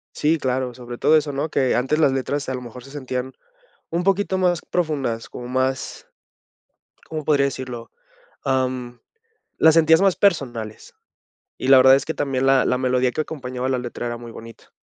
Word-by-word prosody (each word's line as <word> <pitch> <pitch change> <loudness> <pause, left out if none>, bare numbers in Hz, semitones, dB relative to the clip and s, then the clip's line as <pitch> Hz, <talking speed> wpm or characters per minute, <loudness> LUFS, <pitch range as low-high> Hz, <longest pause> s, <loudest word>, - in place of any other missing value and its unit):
Sí, 160 +2 +1
claro, 130 -2 -2
sobre 120 -1 -9
todo 155 - +4
eso, 150 -1 0
¿no?, 145 +3 -2
que 130 -3 +1
antes 135 +5 0
las 140 -4 +4
letras, 135 +2 -2
a 130 - -2
lo 125 - -4
mejor, 125 +1 -10
se 135 - -13
sentían 130 -2 -4 0.6
un 170 +2 -1
poquito 195 0 +1
más 180 -3 +1
profundas, 140 -10 -2
como 120 0 -8
más, 130 +1 -2 1.0
¿cómo 155 -1 -5
podría 145 -2 +3
decirlo?, 130 -3 -5 0.5
am, 130 -2 -1 0.6
las 160 0 +5
sentías 160 +2 +5
más 195 -2 +3
personales, 120 - -1 0.6
y 130 - -4
la 135 -1 +8
verdad 130 +1 +7
es - - -2
que 160 - -3
también 135 -2 -1
la 135 -1 +4
la 125 - +2
melodía 125 -1 +1
que 155 - -1
acompañaba 130 -4 -5
la 130 - 0
letra 120 0 -5
era 120 0 -4
muy 120 -1 -10
bonita. 115 0 -13
130 Hz, 180 wpm, -22 LUFS, 125-150 Hz, 1.0 s, la